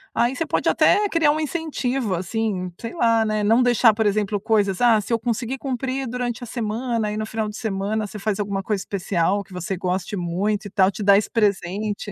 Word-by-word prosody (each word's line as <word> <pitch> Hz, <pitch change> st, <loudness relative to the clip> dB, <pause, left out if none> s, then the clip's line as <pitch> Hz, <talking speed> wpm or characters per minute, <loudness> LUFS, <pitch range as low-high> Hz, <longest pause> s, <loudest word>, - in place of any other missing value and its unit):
aí 240 Hz, +3 st, +2 dB
você 330 Hz, -, -1 dB
pode -, -, -1 dB
até 415 Hz, 0 st, +4 dB
criar 330 Hz, -5 st, +2 dB
um 305 Hz, -, -1 dB
incentivo, 275 Hz, -, -2 dB
assim. 185 Hz, 0 st, -2 dB
Sei 230 Hz, -, -6 dB
lá, 230 Hz, -7 st, +3 dB
né. 215 Hz, -1 st, -1 dB
Não 225 Hz, +4 st, +4 dB
deixar, 240 Hz, -2 st, +5 dB
por 220 Hz, 0 st, +1 dB
exemplo, 205 Hz, 0 st, 0 dB
coisas: 205 Hz, -3 st, +1 dB
"Ah, 235 Hz, -3 st, +5 dB
se 210 Hz, +3 st, -3 dB
eu 230 Hz, -, +2 dB
conseguir 240 Hz, +2 st, -2 dB
cumprir 265 Hz, 0 st, -3 dB
durante 245 Hz, 0 st, -3 dB
a -, -, -7 dB
semana," 230 Hz, 0 st, -2 dB
aí 210 Hz, -, -3 dB
no 215 Hz, 0 st, -2 dB
final 220 Hz, -1 st, -2 dB
de 210 Hz, -, -7 dB
semana, 210 Hz, 0 st, -2 dB
você 210 Hz, -, -8 dB
faz 210 Hz, 0 st, -2 dB
alguma 200 Hz, -1 st, -2 dB
coisa 205 Hz, -1 st, -1 dB
especial 195 Hz, 0 st, -1 dB
que 190 Hz, -, -17 dB
você 180 Hz, +2 st, -4 dB
goste 185 Hz, +2 st, -2 dB
muito 190 Hz, +5 st, -1 dB
e -, -, -6 dB
tal. 190 Hz, 0 st, +4 dB
Te 205 Hz, +2 st, -5 dB
dá 200 Hz, 0 st, +6 dB
esse 205 Hz, -, +1 dB
presente. 205 Hz, 0 st, -1 dB
215 Hz, 220 wpm, -22 LUFS, 200-240 Hz, -, dá